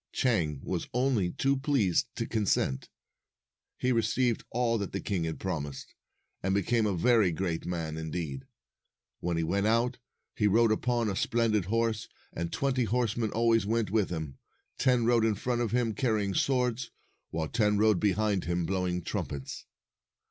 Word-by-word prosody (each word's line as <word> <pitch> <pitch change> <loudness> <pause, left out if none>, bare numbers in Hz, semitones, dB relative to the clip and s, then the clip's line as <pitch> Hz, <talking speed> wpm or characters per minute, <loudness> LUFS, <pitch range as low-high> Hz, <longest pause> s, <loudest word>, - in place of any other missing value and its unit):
250 - - -5
Chang 85 - +1
was - - -2
only 125 -8 +2
too 135 +9 +1
pleased 135 - +1
to - - -2
consent. 100 - 0 0.9
He 130 - +1
received 115 +1 +1
all 115 -1 +1
that 100 - -4
the 100 - -1
king 95 -5 -2
had 80 - -4
promised, 75 -7 -4 0.5
and 95 +1 0
became 110 +3 +2
a 95 -3 -1
very 110 0 +4
great 85 0 -2
man, 80 -3 -3
indeed. 80 -4 -4 0.7
When 85 -1 -1
he 85 - +1
went 100 +5 +1
out, 120 +3 +1 0.4
he 105 - +2
rode 115 +2 +4
upon 120 +1 +1
a 100 - -1
splendid 115 -4 +1
horse, 115 +1 0 0.3
and 85 0 -3
twenty 130 -3 0
horsemen 115 0 0
always 115 -1 +2
went 115 -2 0
with 110 -3 +2
him. 80 -5 -5 0.4
Ten 125 -3 +3
rode 120 -1 +4
in 110 -2 +2
front 120 +4 -1
of 120 - 0
him, 120 -2 +1
carrying 105 -5 0
swords, 125 0 0 0.4
while 80 -1 -2
ten 105 +1 +2
rode 105 -3 +4
behind 105 -2 +1
him, 85 +1 -1
blowing 90 -2 -1
trumpets. 70 -4 -5
105 Hz, 165 wpm, -29 LUFS, 90-120 Hz, 0.9 s, very